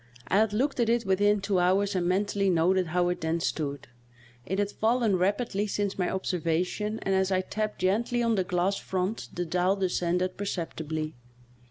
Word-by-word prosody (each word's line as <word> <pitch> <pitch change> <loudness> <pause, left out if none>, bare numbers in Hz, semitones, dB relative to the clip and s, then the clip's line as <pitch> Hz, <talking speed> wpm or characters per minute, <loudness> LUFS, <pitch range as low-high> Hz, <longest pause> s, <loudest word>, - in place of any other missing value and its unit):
I 195 - +3
had 220 -1 +3
looked 260 +6 0
at 235 -1 +2
it 235 0 +2
within 205 +2 +3
two 195 -1 +1
hours 195 +3 +2
and 175 -1 +1
mentally 195 +1 +1
noted 180 +1 +2
how 175 +2 +1
it 180 - -3
then 160 +1 0
stood; 145 -5 -3 0.6
it 190 - -1
had 205 0 0
fallen 225 -2 +2
rapidly 205 +3 0
since 200 -1 -2
my 180 - +1
observa 175 -3 0
tion, 210 +4 -3
and 195 - 0
as 190 0 +2
I 185 0 +2
tapped 215 +2 -4
gently 230 +6 +1
on 230 -1 +2
the 190 -3 +1
glass 180 +2 0
front 190 +4 -3
the 175 - -3
dial 180 +3 +1
descended 180 -1 0
perceptibly. 160 -5 -3
190 Hz, 185 wpm, -28 LUFS, 180-205 Hz, 0.6 s, I